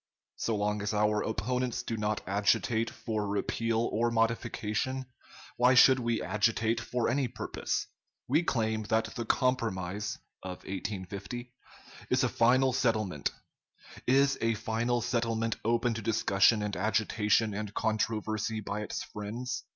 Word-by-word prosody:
So 115 - -1
long 105 0 0
as 105 +1 -2
our 105 0 +2
opponents 125 +4 -1
do 115 - -3
not 105 -1 -1
agitate 110 +3 +2
for 110 -2 -3
repeal 115 +3 0
or 120 +2 +2
modification, 115 +2 -1 0.5
why 125 +1 +5
should 130 +1 +7
we 115 -2 -1
agitate 110 +4 +1
for 120 0 -1
any 130 +2 +1
purpose! - - -3 0.4
We 150 +6 +3
claim 110 -8 0
that 110 +1 0
the 120 - -4
compromise 105 -6 0 0.2
[of 90 -1 -7
1850] 100 +5 -5 0.6
is - - +3
a - - +2
final 130 +2 +3
settlement. 110 - 0 0.8
Is 135 +2 +4
a 115 0 +2
final 115 +2 0
settlement 115 -1 0
open 115 +1 +2
to 115 - -4
discussion 105 0 +3
and 105 -1 -2
agitation 110 +1 +1
and 105 0 -4
controversy 110 0 -1
by 105 0 -4
its 105 - -4
friends? 110 +5 -5
110 Hz, 135 wpm, -30 LUFS, 105-120 Hz, 0.8 s, should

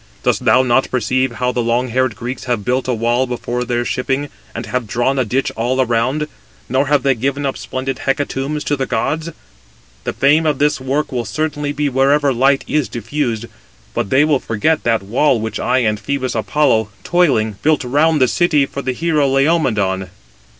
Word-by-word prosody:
Dost - - 0
thou 130 - +5
not 130 +1 +2
perceive 130 0 0
how 125 +2 -1
the 125 - -1
long 120 +2 0
haired 130 -1 0
Greeks 125 +2 -6
have 120 -5 -2
built 130 +1 0
a 125 - +1
wall 120 +3 +1
before 125 0 -3
their 120 0 -1
shipping, 135 +4 -1 0.3
and 115 - -4
have 120 +1 -3
drawn 125 +5 0
a 130 - +1
ditch 130 +5 -1
all 130 +3 +1
round, 125 +6 0 0.4
nor 130 +3 +1
have 145 -2 +2
they 135 - +3
given 140 +4 -2
splendid 130 0 -4
hecatombs 140 +1 -2
to 145 - 0
the 135 -2 -2
gods? 160 +1 -1 0.7
The - - -2
fame 150 +4 +3
of 150 -3 +1
this 145 -1 +1
[work] 135 +3 -1
will 125 -2 -1
certainly 145 +6 -2
be 145 0 -1
wherever 140 +1 +2
light 135 +3 +3
is 150 -3 0
diffused: 120 -1 -2 0.5
but - - -2
they 135 +6 +4
will 150 -3 +2
forget 135 +9 0
that 115 -3 +1
[wall] 125 +5 +2
which 110 +1 -4
I 130 0 +1
and 105 -1 0
Phœbus 130 +2 -2
Apollo, 110 -2 +1
toiling, 130 - +2
built 155 -2 +2
round 150 +5 +2
the 130 - +4
city 155 -1 +2
for 140 - -6
the 130 -1 -2
hero 155 -1 +1
Laomedon." 130 - +1
130 Hz, 185 wpm, -17 LUFS, 120-145 Hz, 0.7 s, thou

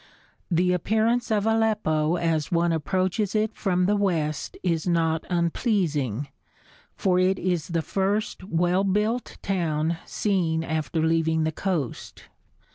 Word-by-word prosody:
The 180 +1 +2
appearance 220 +7 +1
of 210 -2 +1
Aleppo 210 -8 +1
as 165 -3 0
one 170 0 +2
approaches 185 +6 0
it 215 +1 +1
from 180 -3 +1
the 205 +2 +2
west 165 -7 -1
is 170 -2 0
not 165 -2 +1
unpleasing, 170 - 0 0.7
for 180 -1 +2
it 185 +1 +3
is 175 -4 -1
the 165 -2 -1
first 195 +5 -1
well 180 +1 +1
built 210 +5 0
town 165 -4 0
seen 170 -6 0
after 160 0 -1
leaving 160 0 +2
the 160 - 0
coast. 160 - -4
175 Hz, 125 wpm, -25 LUFS, 160-200 Hz, 0.7 s, it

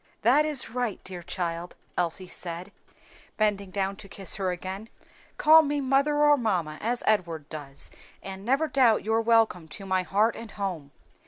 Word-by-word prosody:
"That 270 +7 +5
is 290 -7 0
right, 245 -3 -2
dear 180 -2 -7
child," 170 0 -4 0.2
Elsie 175 +1 0
said, 180 +1 -6 0.7
bending 205 -2 +1
down 195 +1 -2
to 200 -2 -12
kiss 195 0 0
her 190 -2 -1
again, 190 +4 -5 0.5
"call 315 +1 +8
me 290 -1 -1
mother 275 +2 +2
or 295 0 +6
mamma, 180 - -1
as 240 +2 -1
Edward 170 -8 0
does, 145 -3 -7 0.3
and 195 0 -7
never 270 +8 +2
doubt 255 -6 +3
your 225 +1 +2
welcome 225 -7 +2
to 195 +6 -8
my 185 -1 +1
heart 205 +5 +1
and 230 -1 -8
home. 185 -9 -4
200 Hz, 165 wpm, -27 LUFS, 180-235 Hz, 0.7 s, call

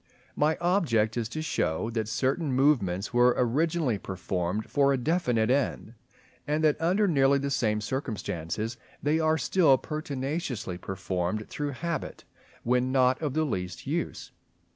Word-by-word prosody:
My 155 +2 +2
object 155 - +2
is 115 -2 -2
to 155 +5 -4
show 110 - -1
that 110 -2 -2
certain 135 +6 0
movements 125 -9 +2
were 120 0 +5
originally 140 -1 +1
performed 95 +2 -3
for 140 -1 +3
a 135 - +2
definite 125 -6 +1
end, 130 -4 -1 0.5
and 150 +2 0
that, 155 0 +2
under 190 +5 +2
nearly 140 -4 +4
the 140 0 -2
same 105 -5 +1
circumstances, 110 - -3 0.3
they 150 +3 +2
are 160 0 +2
still 145 +1 +4
pertinaciously 135 - -4
performed 95 +2 -3
through 145 -1 -3
habit 170 -2 -3 0.4
when 125 +1 +1
not 130 0 +3
of 150 -3 -2
the 155 - +2
least 90 -9 -4
use. - - -3
130 Hz, 140 wpm, -28 LUFS, 110-150 Hz, 0.5 s, were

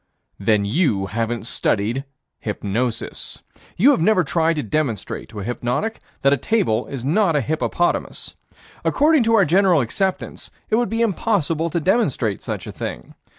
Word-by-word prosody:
Then 100 0 +2
you 110 - +1
haven't 115 +3 -2
studied 115 +4 0 0.3
hypnosis. 115 +4 -3 0.3
You 255 +11 +6
have 220 - +1
never 185 0 +4
tried 165 +3 +1
to 150 - -2
demonstrate 115 -3 -2
to 105 -2 -7
a - - -5
hypnotic 120 - -2 0.2
that 140 +1 +5
a - - +2
table 135 - 0
is 130 -3 -6
not 170 +2 +2
a - - +4
hippopotamus. 160 +5 -1 0.5
According 305 0 +3
to 230 0 +4
our 200 -4 +5
general 180 +1 +4
acceptance, 185 - -2 0.2
it 215 - +4
would 240 0 +1
be 225 +1 +1
impossible 170 -7 0
to 170 - -1
demonstrate 150 - +1
such - - -4
a - - -6
thing. - - -6
150 Hz, 155 wpm, -21 LUFS, 115-195 Hz, 0.5 s, You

